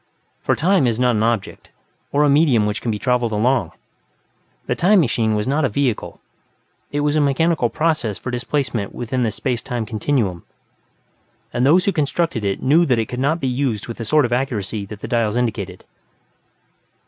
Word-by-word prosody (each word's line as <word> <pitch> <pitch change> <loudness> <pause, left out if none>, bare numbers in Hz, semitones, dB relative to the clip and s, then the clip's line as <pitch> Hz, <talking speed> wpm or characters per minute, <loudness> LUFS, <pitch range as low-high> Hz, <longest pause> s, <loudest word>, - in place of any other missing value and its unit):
For - - 0
"Time" 180 -4 +2
is 115 -1 -1
not 125 -2 +3
an 105 - 0
object, 115 -2 -2 0.4
or 145 +1 +3
a - - +4
medium 140 -7 +4
which 105 0 -2
can 120 - -3
be 105 - -1
travelled 120 +2 0
along. 110 -4 +1 0.9
The - - 0
"Time 195 +3 +4
Machine" 115 -7 +1
was 105 +3 -1
not 145 +4 +1
a 135 - +2
vehicle; 125 -1 -2 0.7
it 145 - -1
was 145 0 +1
a 155 - +3
mechanical 145 -1 +2
process 155 -10 -1
of 125 - -6
displacement 125 -4 -2
within 125 +2 -2
the 115 - +2
space 120 +2 -2
time 120 -3 -3
continuum, 105 -4 -1 1.1
and 125 +2 +2
those 180 +5 +4
who 200 - +3
constructed 160 - -1
it 100 -1 -2
knew 155 +6 +4
that 125 -3 +2
it 110 -1 -1
could 125 - -4
not 145 +5 +1
be 135 - -2
used 125 -5 -1
with 115 - -6
the 115 - -5
sort 150 +4 +3
of 120 - -1
accuracy 110 -5 -2
that 105 0 -9
the - - -5
dials 115 -2 0
indicated. 120 -3 -3
125 Hz, 190 wpm, -20 LUFS, 110-145 Hz, 1.1 s, a